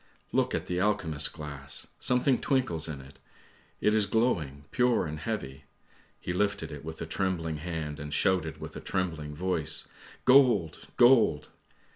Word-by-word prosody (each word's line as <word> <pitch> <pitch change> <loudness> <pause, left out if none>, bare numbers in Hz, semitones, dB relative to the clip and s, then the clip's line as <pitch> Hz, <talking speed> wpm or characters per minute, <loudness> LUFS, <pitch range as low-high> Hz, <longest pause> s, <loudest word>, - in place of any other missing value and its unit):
"Look - - +1
at - - -3
the 90 0 -2
alchemist's 90 -7 +2
glass! 70 -3 -3
something 125 +1 +2
twinkles 90 - +1
in 75 -4 -6
it, 70 +1 -16 0.6
it 105 - +3
is 110 -2 +3
glowing, 80 - 0
pure 125 -4 +2
and 75 -1 -5
heavy. 75 -9 -5 0.5
He 90 - -4
lifted 100 -4 -1
it 75 -1 -8
with 80 +1 -7
a - - -4
trembling 80 -2 -2
hand 80 -2 -5
and 75 +1 -6
shouted 80 0 +1
with - - -8
a - - -5
trembling 80 -6 -3
voice: 85 -2 -1 0.2
' - - -21
Gold! 120 - +4
gold! 120 - +5
80 Hz, 155 wpm, -29 LUFS, 75-105 Hz, 0.6 s, gold